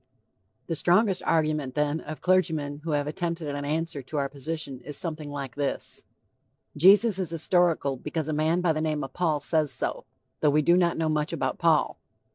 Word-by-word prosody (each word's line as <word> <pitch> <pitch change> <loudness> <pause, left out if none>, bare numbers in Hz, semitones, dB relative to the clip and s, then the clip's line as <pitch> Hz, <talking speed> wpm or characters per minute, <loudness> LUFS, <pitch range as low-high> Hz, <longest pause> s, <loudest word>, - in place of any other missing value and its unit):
The 165 - -3
strongest 185 +4 +2
argument 155 -4 +1
then 150 +1 0
of 155 -2 -8
clergymen 160 -6 +1
who 160 -2 -2
have 145 -1 +1
attempted 165 +1 -3
an 145 0 -4
answer 155 0 -2
to 140 +4 -6
our 140 -1 0
position 140 -1 -5
is 145 +3 -1
something 155 -3 -3
like 140 -3 -5
this: 145 -1 -2 0.7
Jesus 195 +5 +6
is 185 -4 -1
historical 165 -4 +1
because 150 +3 -4
a 155 - -1
man 160 +4 +1
by 175 -3 +2
the 155 - -2
name 155 -2 -1
of 135 - -7
Paul 160 -5 0
says 155 -1 +1
so, - - -4 0.3
though 150 - +3
we 150 +1 +3
do 170 +4 +5
not 175 -2 +2
know 160 -1 0
much 150 -1 0
about 135 -5 -2
Paul. 165 -3 +2
155 Hz, 190 wpm, -26 LUFS, 145-170 Hz, 0.7 s, Jesus